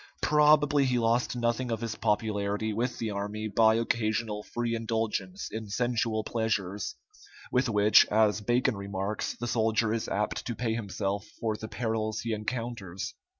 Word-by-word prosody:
Probably 150 -1 +5
he 125 -1 +1
lost 120 +2 +1
nothing 120 +1 0
of 115 -2 -1
his 115 -1 -2
popularity 105 0 0
with 120 +4 -1
the 110 -2 -2
army 105 +2 -3
by 110 +1 +4
occasional 110 -2 0
free 120 +1 -3
indulgence 115 - -2
in 110 -1 -5
sensual 115 -1 0
pleasures, 105 -4 -2 0.6
with 125 0 +2
which, 105 -1 +6
as 105 0 +3
Bacon 120 +3 +2
remarks, 100 +1 -3
the 120 - -4
soldier 110 -2 +1
is 115 - -2
apt 105 +2 -1
to 120 - -2
pay 115 -1 -1
himself 100 -2 -3
for 110 -2 -1
the 110 - -7
perils 110 -1 -2
he 115 -1 -2
encounters. 105 -4 -4
110 Hz, 150 wpm, -29 LUFS, 105-120 Hz, 0.6 s, which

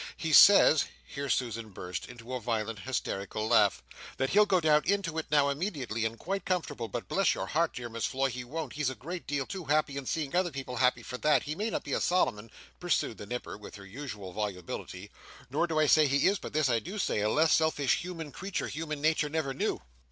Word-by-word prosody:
"He 160 -2 -2
says," 175 -4 +8 0.2
here 140 0 -5
Susan 115 -4 -1
burst 90 -2 -6
into 120 0 -9
a 125 - -2
violent 115 -2 -2
hysterical 110 -3 -3
laugh, 100 - +3 0.3
"that 135 0 0
he'll 210 +1 +5
go 185 - +3
down 155 -2 +4
into 185 -4 0
it 160 - -5
now 145 -1 +4
immediately 140 - -2
and 115 +1 -2
quite 195 +8 -3
comfortable, 155 -10 -2
but 115 +3 -5
bless 195 -4 +2
your - - -3
heart 165 +2 0
my - - -16
dear 125 -2 -5
Miss 115 0 -2
Floy 135 0 0
he 125 +1 -5
won't, 145 +2 -5
he's 150 -3 0
a 130 - -6
great 170 - -7
deal 140 -2 -1
too 185 +1 -6
happy 145 -1 +1
in 135 -2 -5
seeing 155 -1 -2
other 180 0 +2
people 135 -4 -6
happy 125 -1 +2
for 125 +2 -6
that, 150 0 +3
he 150 - -3
may 210 +7 -2
not - - -3
be - - -4
a - - 0
Solomon," 115 -12 +1 0.3
pursued 175 -10 0
the 100 - -8
Nipper, 120 -2 -5
with 105 - -10
her 100 -1 -11
usual 105 -4 -7
volubility, 95 -1 -5 0.4
"nor 155 +5 +1
do 160 -2 -2
I 155 - +4
say 155 +1 +5
he 140 0 +2
is 200 +1 +2
but - - -7
this 155 -1 +2
I 120 -2 +2
do 190 - -7
say 180 - 0
a 105 - +1
less 155 +6 +3
selfish 160 -4 +2
human 165 -4 -6
creature 195 +4 -4
human 155 -1 -4
nature 155 -1 +2
never 150 -3 -2
knew!" - - -2
140 Hz, 230 wpm, -30 LUFS, 115-160 Hz, 0.4 s, says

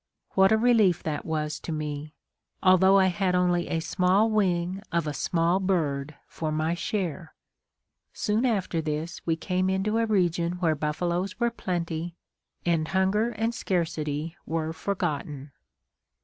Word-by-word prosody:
What 190 +1 +4
a 220 - +5
relief 220 -7 +3
that 155 -1 -3
was 150 -1 -2
to - - -6
me 150 -1 -4 0.5
although 190 +1 +6
I 190 - +5
had 185 0 +1
only 175 -1 +2
a 165 - -1
small 185 +6 +2
wing 185 -2 +1
of 170 -1 0
a 150 - -2
small 170 +5 +1
bird 155 -7 -1
for 155 -1 -4
my 155 +2 0
share! 175 -3 -3 0.8
Soon 215 +2 0
after 195 -9 0
this, 155 +2 -4
we 165 - +2
came 185 +2 -1
into 200 +4 0
a 230 - +1
region 175 -4 +1
where 175 -3 +1
buffaloes 175 +6 -2
were 235 -1 +2
plenty, 170 -5 -3 0.5
and 165 -2 +1
hunger 190 +5 +2
and 225 0 -1
scarcity 165 -5 -2
were 160 0 -2
forgotten. 150 -6 -3
175 Hz, 145 wpm, -27 LUFS, 160-190 Hz, 0.8 s, although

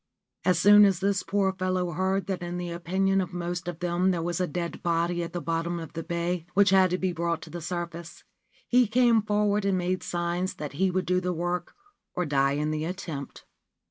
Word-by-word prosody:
As 180 0 +3
soon 205 +3 +7
as 195 -3 +4
this 195 -1 +1
poor 195 -1 0
fellow 185 -1 -1
heard 190 +2 0
that 190 -1 -3
in 175 0 -4
the 175 -1 -4
opinion 190 +3 +1
of 180 0 -5
most 175 0 -4
of 175 -1 -5
them 175 +1 +1
there 175 -3 0
was 175 +1 -2
a 180 - +1
dead 170 +1 -4
body 170 +1 0
at 170 - -4
the 175 - -3
bottom 170 +1 -2
of 165 -2 -8
the 165 - -4
bay 170 0 -2
which 200 -1 +5
had 190 -1 +5
to 180 - 0
be 185 0 -1
brought 170 -1 -2
to 160 - -11
the 175 +1 -6
surface, 170 0 -6 0.4
he 250 -1 +4
came 235 0 +4
forward 210 0 +1
and 195 -1 +1
made 180 +1 -1
signs 175 +1 -2
that 150 -2 -6
he 190 +6 +1
would 185 0 -1
do 180 0 +1
the 180 0 -1
work 175 +1 -3 0.4
or 180 - 0
die 140 -2 +2
in 150 +2 -1
the 155 0 -2
attempt. 160 -5 -6
175 Hz, 220 wpm, -27 LUFS, 170-190 Hz, 0.4 s, soon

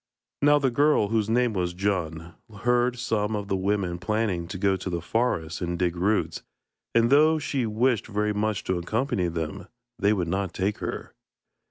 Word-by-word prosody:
Now 145 +1 +6
the 135 -3 +1
girl, 145 -5 +3
whose 110 -1 0
name 120 0 +2
was 90 -3 -2
Djun, 85 -4 -2 0.3
heard 120 0 +2
some 110 -2 -1
of 100 -1 -4
the 95 - +1
women 95 -2 -1
planning 100 -4 -1
to 95 - -6
go 95 0 +2
to 95 0 -5
the 85 -1 -2
forest 85 -6 -1
and 85 0 -2
dig 90 -1 0
roots, 100 +5 0 0.5
and 115 +1 +4
though 155 +3 +5
she 135 -5 -1
wished 115 +1 +1
very 105 -1 0
much 105 -1 -1
to 95 -1 -1
accompany 110 +1 -1
them, 85 +3 -4 0.3
they 100 - +3
would 95 -5 0
not 95 +1 -2
take 100 +2 -1
her. - - -5
105 Hz, 180 wpm, -26 LUFS, 90-115 Hz, 0.5 s, Now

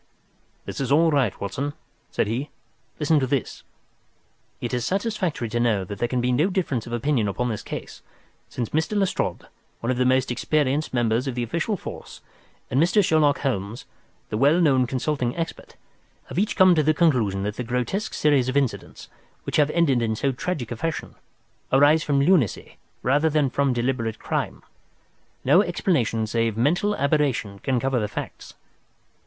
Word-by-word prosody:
"This - - -5
is 135 - -2
all 160 +3 +5
right, 135 -9 +1
Watson," 140 +9 -3 0.4
said - - 0
he. 120 +7 -3 0.5
"Listen 150 0 +3
to 130 - 0
this: 135 -2 -2 1.0
"It 120 +1 -4
is 125 -1 0
satisfactory 190 - -1
to 120 +2 -1
know 115 -5 +2
that 100 +2 -7
there 120 - +1
can 125 0 -1
be 125 +1 +1
no 150 +10 +2
difference 155 - -2
of 120 - -6
opinion 120 -2 +1
upon 120 +5 -1
this 110 -3 -3
case, - - -7 0.5
since 120 -3 -4
Mr. 160 +7 0
Lestrade, 195 -2 -1 0.3
one 115 - -1
of 125 - -1
the 125 - +2
most 130 0 +2
experienced 145 +3 0
members 120 +1 +1
of 130 - -3
the 120 - -1
official 170 - -2
force, - - -9 0.5
and 130 - +3
Mr. 185 +4 +3
Sherlock 150 -3 +3
Holmes, 115 -4 -3 0.4
the 105 - -2
well 145 +6 +4
known 135 -7 +3
consulting 130 0 -2
expert, 165 -1 -5 0.5
have - - -2
each 210 +2 0
come 185 -2 +6
to 160 - +3
the 155 +1 +2
conclusion 120 - +2
that 105 +1 -3
the 125 - -2
grotesque 125 - -2
series 140 -4 +2
of 130 - 0
incidents, 135 -4 -2 0.4
which - - -2
have 150 -1 +4
ended 150 -7 +2
in 110 -1 0
so 135 +5 0
tragic 130 -2 -4
a - - -2
fashion, 165 +5 -3 0.6
arise 145 +4 +5
from 145 -3 +1
lunacy 140 - +1 0.3
rather 145 +5 +3
than 145 -4 +1
from 140 -1 +1
deliberate 120 -2 -1
crime. - - -3 0.8
No - - +6
explanation 115 - 0
save 115 0 -1
mental 175 - +2
aberration 140 - 0
can 130 +1 0
cover 130 0 0
the 105 - -1
facts. - - -7
135 Hz, 175 wpm, -24 LUFS, 120-155 Hz, 1.0 s, come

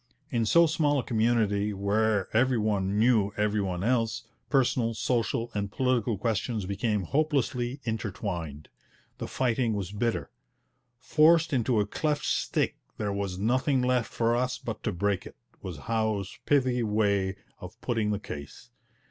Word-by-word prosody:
In 115 -2 +1
so 170 +8 +6
small 150 -2 +1
a 130 - 0
community, 110 -3 +1
where 100 +1 +1
every 125 +2 +3
one 100 -2 0
knew 110 -3 +3
every 105 0 +1
one 90 -2 -2
else, 115 -1 0 0.3
personal, 125 -4 +2
social, 115 0 -1
and 100 -1 -2
political 120 -3 +1
questions 110 0 -1
became 105 +1 -1
hopelessly 135 - 0
intertwined. 90 - -4 0.5
The - - -4
fighting 120 -2 0
was 100 -2 -4
bitter. 115 +3 -2 0.7
'Forced 160 +5 +4
into 120 -3 +2
a 105 - +2
cleft 150 +7 -1
stick, - - 0 0.2
there 105 -2 -2
was 100 -2 -3
nothing 130 +5 +1
left 125 -2 +1
for 115 0 +1
us 125 +1 0
but 115 - -6
to 110 - +1
break 100 +1 -1
it,' - - -14 0.2
was 90 -4 -6
Howe's 110 +2 -2
pithy 130 -4 +2
way 100 -3 +1 0.2
of - - -10
putting 115 -3 0
the 105 - 0
case. 70 - -9
110 Hz, 150 wpm, -28 LUFS, 100-125 Hz, 0.7 s, so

